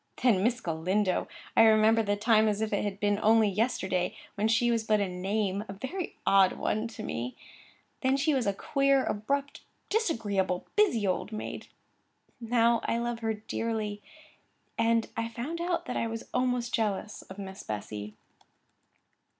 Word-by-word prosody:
Then 225 -7 +4
Miss 240 +4 +1
Galindo! 180 +4 0 0.3
I - - +7
remembered 220 0 +5
the 205 - +2
time 220 +1 +4
as 210 -1 0
if 220 -1 -1
it 205 - +1
had 200 -1 -3
been 205 0 +1
only 220 0 +5
yesterday, 190 -4 0 0.2
when 210 +2 0
she 230 +2 +3
was 230 -1 +1
but 215 -1 +2
a 200 - +1
name—and 195 +2 -2
a - - -4
very 265 - -5
odd 195 -1 +5
one—to 220 0 -2
me; 120 - -4 0.7
then 265 0 +2
she 280 +2 +2
was 260 -6 0
a - - +4
queer, 275 +5 +2
abrupt, 275 +7 -2 0.3
disagreeable, 205 - 0
busy 385 - +3
old 190 +2 -1
maid. 215 - -6 0.7
Now 235 0 +2
I 230 - 0
loved 235 0 -2
her 225 -1 -1
dearly, 215 -1 -3 0.7
and 230 0 +2
I 230 0 -2
found 270 +9 -5
out 350 0 -1
that - - -3
I 230 - 0
was 225 0 -6
almost 250 -1 0
jealous 210 -1 -1
of 190 - -9
Miss 195 0 -7
Bessy. 105 0 -6
220 Hz, 160 wpm, -29 LUFS, 200-235 Hz, 0.7 s, I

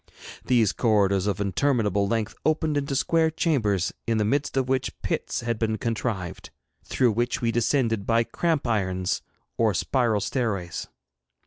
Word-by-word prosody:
These 120 -5 +3
corridors 100 -4 +2
of 100 -2 -1
interminable 105 -1 +1
length 110 0 -1
opened 155 -1 +1
into 140 -1 -1
square 160 +3 +2
chambers, 115 - 0
in 115 -1 +1
the 105 - +1
midst 140 +4 0
of 130 -1 +1
which 130 0 -1
pits - - -2
had 120 -2 -2
been 110 -1 0
contrived, 110 -6 -3 0.3
through 125 -3 +2
which 120 +3 -1
we 115 -1 0
descended 115 -3 +1
by 115 0 +3
cramp 160 +4 -1
irons 95 -5 0 0.4
or 110 -4 +3
spiral 120 0 +1
stairways. 100 -10 -2
115 Hz, 145 wpm, -25 LUFS, 105-130 Hz, 0.4 s, These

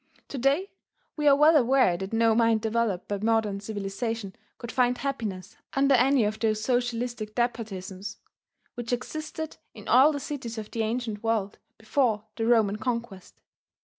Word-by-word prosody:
To 275 - -5
day 280 +10 +1 0.4
we 300 -1 0
are 280 - +8
well 305 +3 +6
aware 260 - +4
that 190 +2 -5
no 225 0 +3
mind 230 -1 +3
developed 220 -4 -1
by 205 -1 -2
modern 215 -2 +1
civilization 205 +1 -4 0.2
could 235 -1 -7
find 250 -1 +2
happiness 215 -9 -4 0.2
under 275 0 +3
any 265 0 +4
of 215 +1 -1
those 215 -1 +1
socialistic 240 -3 -1
despotisms 210 -4 -3 0.6
which 240 -1 -6
existed 310 +5 -5 0.2
in - - -11
all 270 +5 +6
the 285 - -3
cities 255 -5 -6
of 215 -1 -6
the 230 - -2
ancient 220 -1 -2
world 220 -3 -1 0.2
before 220 -2 0
the 225 -1 -1
Roman 220 -4 +3
conquest. 235 -6 -4
230 Hz, 155 wpm, -27 LUFS, 215-255 Hz, 0.6 s, are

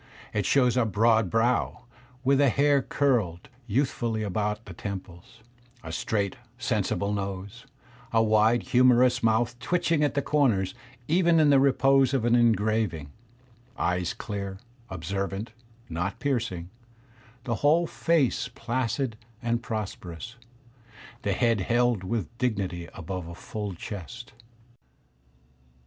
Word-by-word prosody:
It 105 -3 0
shows 125 -3 +3
a 125 - +4
broad 110 0 +3
brow 120 +2 +1 0.4
with 135 +1 +3
the 140 -2 +5
hair 140 +3 +3
curled 115 - 0 0.2
youthfully 115 -2 0
about 105 +2 -2
the 95 - -9
temples; 95 +3 -8 0.4
a 80 - -7
straight, 100 +4 -1 0.2
sensible 100 +1 -1
nose; 100 +5 -5 0.4
a 115 -1 +4
wide, 110 +2 +3
humorous 125 0 +4
mouth 115 +2 +1
twitching 165 +2 +1
at 145 - +1
the 140 - +1
comers 115 -11 +2 0.3
even 170 0 +4
in 150 -2 +5
the 140 - +6
repose 135 0 +4
of 120 -4 0
an 120 - +3
engraving; 110 -9 +2 0.7
eyes 90 0 -1
dear, 100 -2 -5 0.3
observant, 95 +4 -4 0.4
not 90 +4 -3
piercing; 115 -11 -2 0.7
the 120 - -2
whole 160 +4 +4
face 165 -5 +1
placid 120 0 -2 0.3
and 120 0 0
prosperous; 110 -2 -6 0.9
the 100 -3 0
head 115 0 +2
held 120 0 +1
with 105 -2 -3
dignity 95 -8 -2
above 90 +1 -5
a 85 - -8
full 105 +1 -5
chest. 110 +8 -8
115 Hz, 120 wpm, -27 LUFS, 95-125 Hz, 0.9 s, the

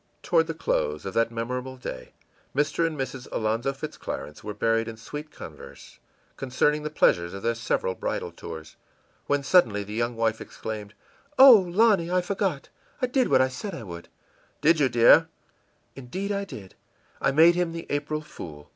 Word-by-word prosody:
Toward 485 - +3
the - - -4
close - - -1
of - - -4
that 115 0 +2
memorable 125 +3 -4
day 65 - -8 0.4
Mr. 150 +3 +1
and 155 -2 -5
Mrs. 130 -1 -5
Alonzo 115 +4 0
Fitz 135 - -7
Clarence 75 0 -6
were 105 -1 -6
buried 115 0 +1
in 115 -1 -7
sweet 150 +6 -8
converse 70 - -12 0.4
concerning 140 +3 +1
the 150 - -4
pleasures 85 - +2
of 100 - -8
their 115 - +1
several 115 -5 -1
bridal - - -3
tours, 80 -1 -9 0.5
when 145 -1 +1
suddenly 115 - +3
the 105 +1 -8
young 120 +2 -1
wife 115 -1 0
exclaimed: 105 -1 -7 0.4
ìOh, 230 -10 +8
Lonny, 205 -6 +4
I 180 0 +2
forgot! 190 -5 -2 0.3
I 255 - +2
did 255 0 +1
what 130 - +4
I 130 - +4
said 165 +9 -6
I 115 - -7
would.î 85 -4 -9 0.6
ìDid 165 -1 +5
you, 140 -3 +3
dear?î 120 +7 +6 0.7
ìIndeed, 190 +11 -4
I 200 0 -2
did. 100 - -10 0.5
I - - +3
made 160 +5 +6
him 175 -1 0
the 165 0 -6
April 150 +1 -2
fool! 75 - -10
135 Hz, 175 wpm, -26 LUFS, 115-170 Hz, 0.7 s, ìOh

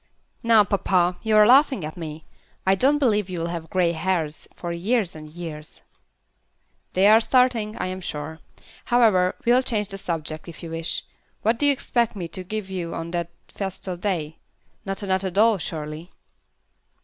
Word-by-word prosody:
"Now, 230 -3 +6
papa, 185 -3 +1
you 220 -1 +1
are 210 - +8
laughing 265 - +5
at 155 - -7
me. 160 -2 -7 0.4
I 190 - +5
don't 270 +9 +3
believe 210 -8 +1
you'll 170 -2 -3
have 165 -1 -6
grey 180 -2 +2
hairs 165 -3 -2
for 175 - -5
years 190 +2 0
and 155 -1 -9
years." 155 -2 -8 1.1
"They 190 +2 +3
are 215 +2 +8
starting, 235 -3 +2
I - - -2
am 185 +1 -4
sure. 160 -1 -5 0.5
However, 215 -7 +3
we'll 245 +2 +5
change 215 -5 -1
the 195 -1 -5
subject, 160 -3 -4
if 170 0 -10
you 165 - -6
wish. 165 0 -3 0.4
What 225 +2 +2
do 290 - +3
you - - +6
expect 240 -4 0
me 180 -4 -4
to 185 +1 -6
give 210 +1 -4
you 180 -3 -4
on 165 0 -5
that 170 -1 -2 0.2
festal 190 -2 -4
day? 170 -5 -3 0.5
Not 195 +1 -4
another 190 -1 0
doll, 210 +3 +3
surely?" 155 +1 -6
185 Hz, 170 wpm, -24 LUFS, 165-215 Hz, 1.1 s, are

